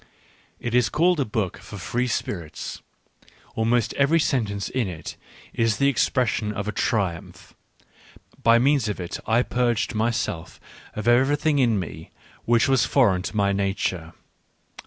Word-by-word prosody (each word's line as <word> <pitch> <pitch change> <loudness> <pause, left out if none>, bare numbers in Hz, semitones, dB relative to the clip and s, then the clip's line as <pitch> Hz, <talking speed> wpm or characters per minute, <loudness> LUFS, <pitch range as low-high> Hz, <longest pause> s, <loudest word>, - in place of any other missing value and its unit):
It 120 - -4
is 125 -1 +3
called 175 +2 +2
a 140 - +1
book 105 -5 -3
for 100 - -10
free 120 +8 -2
spirits: 85 -9 -4 0.7
almost 115 +1 +1
every 140 +4 +3
sentence 105 -9 -1
in 125 -5 -1
it 85 -4 -7 0.4
is 115 -2 +1
the 140 0 +3
ex 135 - +1
pression 115 -4 0
of 105 0 -4
a - - 0
triumph 100 -8 -2 0.5
— - - -24
by 115 0 +5
means 130 -2 +2
of 105 - -4
it 90 0 -5
I 115 +2 +3
purged 120 -2 0
my 110 +2 +1
self 105 -8 -4 0.4
of 110 +1 -4
everything 145 +5 +3
in 115 -5 +3
me 80 -3 -7 0.4
which 120 +3 +3
was 135 -2 +3
foreign 105 -10 +3
to 105 - -5
my 100 -1 +2
nature. 95 -4 -2
115 Hz, 155 wpm, -24 LUFS, 100-125 Hz, 0.7 s, by